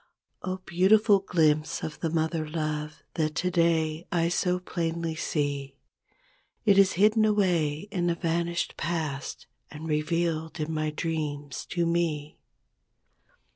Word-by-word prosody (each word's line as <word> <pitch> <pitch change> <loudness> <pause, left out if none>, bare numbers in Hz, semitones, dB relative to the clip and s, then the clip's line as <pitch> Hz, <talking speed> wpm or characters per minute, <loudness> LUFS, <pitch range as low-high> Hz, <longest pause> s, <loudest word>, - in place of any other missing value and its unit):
Oh, 185 0 -3
beautiful 200 +4 +5
glimpse 160 -4 +1
of 155 - -5
the 165 - -1
mother 160 -1 -1
love 155 -1 -3
That 155 -2 -1
today 165 -2 +1
I 170 -1 +2
so 180 +1 +1
plainly 170 -2 -2
see; 145 -3 -2 0.9
It 200 -2 +6
is 195 -1 +5
hidden 215 +4 +4
away 175 -8 +2
in 175 -3 0
the 170 - +2
vanished 170 0 -1
past 155 -5 -3 0.2
And 150 +2 -8
revealed 160 +1 -1
in 155 +1 -2
my 155 0 0
dreams 150 -3 -3
to 170 -1 0
me. 165 -3 -1
165 Hz, 125 wpm, -27 LUFS, 155-175 Hz, 0.9 s, It